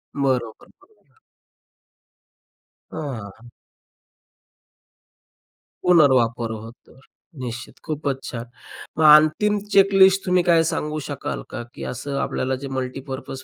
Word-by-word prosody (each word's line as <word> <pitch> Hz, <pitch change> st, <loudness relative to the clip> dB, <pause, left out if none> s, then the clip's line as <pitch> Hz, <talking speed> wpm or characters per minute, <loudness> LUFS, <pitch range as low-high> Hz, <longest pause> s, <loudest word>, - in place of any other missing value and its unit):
बरोबर, 130 Hz, -5 st, -2 dB
बरोबर. 425 Hz, +3 st, -29 dB, 1.7 s
अ, -, -, -9 dB, 0.4 s
हां. 120 Hz, +1 st, -16 dB, 2.3 s
पुनर्वापर 125 Hz, -9 st, +3 dB
होतो. 115 Hz, +3 st, -11 dB, 0.5 s
निश्चित, 120 Hz, 0 st, -8 dB
खूपच 145 Hz, -4 st, -3 dB
छान! 120 Hz, -1 st, -6 dB, 0.5 s
मग 160 Hz, -, +1 dB
अंतिम 205 Hz, +7 st, +3 dB
चेकलिस्ट 195 Hz, -1 st, +5 dB
तुम्ही 180 Hz, -1 st, +2 dB
काय 165 Hz, -2 st, +4 dB
सांगू 150 Hz, 0 st, -3 dB
शकाल -, -, -5 dB
का? 120 Hz, -, -6 dB
की -, -, -9 dB
असं 140 Hz, +3 st, -5 dB
आपल्याला 130 Hz, +1 st, -1 dB
जे -, -, -4 dB
मल्टीपर्पज 130 Hz, 0 st, -6 dB
140 Hz, 100 wpm, -22 LUFS, 125-175 Hz, 2.3 s, चेकलिस्ट